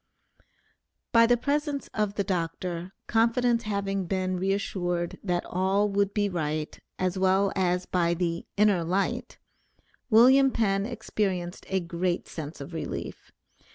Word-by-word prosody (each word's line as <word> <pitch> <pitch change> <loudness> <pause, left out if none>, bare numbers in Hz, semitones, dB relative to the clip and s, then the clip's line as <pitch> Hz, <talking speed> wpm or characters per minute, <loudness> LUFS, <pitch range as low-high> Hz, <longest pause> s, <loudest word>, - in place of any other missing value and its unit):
By 230 -1 +6
the 240 0 +4
presence 285 +2 -1
of 210 -2 -1
the 200 - 0
Dr., 175 -1 -3
confidence 235 +1 +2
having 200 -3 -2
been 185 0 -1
reassured 180 -3 -1
that 175 -3 -1
all 190 +3 +1
would 200 0 +1
be 205 0 +1
right, 155 -4 -2 0.2
as 185 0 -1
well 190 +1 +3
as 180 -1 +1
by 170 -1 +1
the 170 -1 -2
"inner 200 -4 +4
light," 185 +4 -1 0.7
William 260 +4 +7
Penn 200 -4 0
experienced 195 -6 -3
a 190 - +1
great 175 +1 -2
sense 155 -1 -7
of 140 +4 -8
relief. 165 - -6
190 Hz, 130 wpm, -27 LUFS, 175-210 Hz, 0.7 s, William